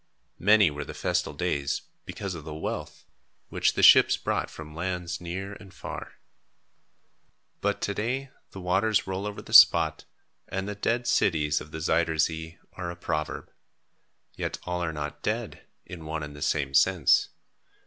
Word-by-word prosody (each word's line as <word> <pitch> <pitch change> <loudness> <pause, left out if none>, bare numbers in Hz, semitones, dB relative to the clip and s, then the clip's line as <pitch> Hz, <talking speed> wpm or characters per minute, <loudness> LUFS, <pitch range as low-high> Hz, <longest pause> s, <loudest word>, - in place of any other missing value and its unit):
Many 105 -3 +5
were 75 0 -5
the - - -9
festal - - -1
days, 70 -1 -1 0.2
because 100 -2 -5
of 80 -3 -8
the 75 0 -7
wealth, 80 - -5 0.4
which - - +1
the - - 0
ships - - +8
brought - - -2
from 75 -1 -10
lands 90 +1 -3
near 95 +3 -5
and 100 -1 -13
far. - - -8 1.5
But 100 0 -1
to 100 - -1
day 125 +6 -3 0.2
the 95 - -10
waters 95 +4 +1
roll 95 +2 -3
over 105 - -7
the - - -10
spot - - +7 0.4
and 95 +1 -3
"The 105 - -3
Dead 115 +4 -1
Cities 75 -9 +2
of 75 - -10
the 80 - -7
Zuyder 80 0 +1
Zee" 80 +2 -1 0.2
are 90 -2 -5
a 85 - -6
proverb. 75 -3 -4 0.8
Yet - - -3
all 90 0 -2
are 80 - -1
not 75 -1 -6
dead, - - -3 0.2
in 90 -3 -9
one 80 0 -4
and 75 0 -8
the 75 - -11
same 70 -3 0
sense. 90 -2 +4
85 Hz, 165 wpm, -27 LUFS, 80-100 Hz, 1.5 s, ships